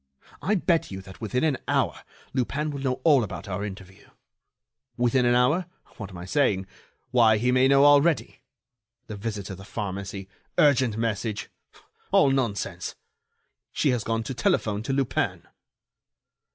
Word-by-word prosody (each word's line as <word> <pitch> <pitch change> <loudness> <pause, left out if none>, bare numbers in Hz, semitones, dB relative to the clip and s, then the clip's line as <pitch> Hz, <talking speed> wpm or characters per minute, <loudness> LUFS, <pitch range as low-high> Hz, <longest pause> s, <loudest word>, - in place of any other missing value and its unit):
I 195 +9 +1
bet 170 -3 +1
you 95 - -6
that 95 +1 -13
within 115 +5 -1
an 150 -5 +1
hour - - 0 0.3
Lupin 140 +4 -1
will 140 - -5
know 130 -1 -1
all 145 -6 +5
about 105 - -6
our 100 +1 -3
interview. 95 -2 -9 0.9
Within 125 +1 +2
an 120 - +4
hour? 150 +8 +2 0.3
What 100 -3 -7
am 95 - -10
I 85 - -7
saying?... 100 -5 +1 0.5
Why, 115 -3 +5
he 125 +4 +1
may 130 +1 +4
know 140 +1 +5
already. 145 +2 +3 0.6
The 110 - -7
visit 105 -1 -4
to 95 - -6
the 95 - -12
pharmacy... 100 -1 -5 0.3
urgent 130 -6 +4
message. 110 -1 -2 0.6
All 140 - +5
nonsense!... 120 -7 -2 0.8
She 145 - +1
has 120 -3 -1
gone 115 0 -1
to 125 - -5
telephone 110 -3 0
to 120 - -3
Lupin." 135 -2 -1
120 Hz, 150 wpm, -26 LUFS, 100-135 Hz, 0.9 s, all